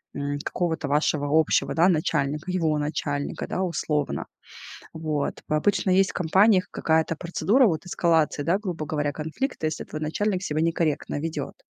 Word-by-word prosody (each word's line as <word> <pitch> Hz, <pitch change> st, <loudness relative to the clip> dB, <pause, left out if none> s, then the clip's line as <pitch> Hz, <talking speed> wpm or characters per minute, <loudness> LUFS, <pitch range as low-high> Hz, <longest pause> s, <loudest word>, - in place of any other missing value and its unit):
м, 145 Hz, 0 st, -2 dB
какого-то 160 Hz, -4 st, -2 dB
вашего 145 Hz, 0 st, +1 dB
общего, 155 Hz, -, +1 dB
да, 170 Hz, +2 st, +5 dB
начальника, 150 Hz, 0 st, 0 dB
его 160 Hz, -4 st, +1 dB
начальника, 145 Hz, -1 st, -3 dB
да, 190 Hz, -, -2 dB
условно. 150 Hz, -4 st, -1 dB, 0.7 s
Вот. 155 Hz, -3 st, -2 dB
По 155 Hz, -, 0 dB
обычно 190 Hz, +4 st, +1 dB
есть 190 Hz, +1 st, +4 dB
в -, -, -31 dB
компаниях 185 Hz, +3 st, +3 dB
какая-то 160 Hz, 0 st, +1 dB
процедура 205 Hz, +9 st, +2 dB
вот 160 Hz, -3 st, -1 dB
эскалации, 165 Hz, -4 st, +1 dB
да, 175 Hz, +5 st, +2 dB
грубо 180 Hz, -7 st, -4 dB
говоря, 145 Hz, -1 st, -1 dB
конфликта, 160 Hz, -, -3 dB
если 155 Hz, -, -3 dB
твой 155 Hz, -, -7 dB
начальник 185 Hz, +5 st, -1 dB
себя 155 Hz, -2 st, -1 dB
некорректно 165 Hz, -3 st, 0 dB
ведёт. 160 Hz, 0 st, -4 dB
160 Hz, 155 wpm, -25 LUFS, 150-180 Hz, 0.7 s, да